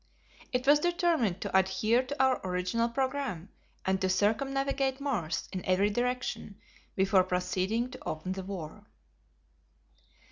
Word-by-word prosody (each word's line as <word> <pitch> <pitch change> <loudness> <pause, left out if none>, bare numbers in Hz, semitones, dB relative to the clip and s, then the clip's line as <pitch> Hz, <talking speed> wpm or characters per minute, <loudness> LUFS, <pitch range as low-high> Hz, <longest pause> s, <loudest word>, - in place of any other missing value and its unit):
It 250 0 -1
was 290 +1 +6
determined 335 - +1
to - - -3
adhere 190 +5 +3
to 285 +3 -6
our 260 -1 +2
original 185 +6 0
programme 260 - -2 0.4
and 190 0 +1
to 190 - +1
circumnavigate 270 +7 +1
Mars 225 - -2
in 185 -2 -4
every 190 +3 +2
direction 245 -3 -2 0.4
before 190 0 +4
proceeding 185 +6 -1
to 255 - -10
open 155 +4 -4
the 190 0 -3
war. 185 -5 -7
215 Hz, 130 wpm, -30 LUFS, 185-265 Hz, 0.4 s, was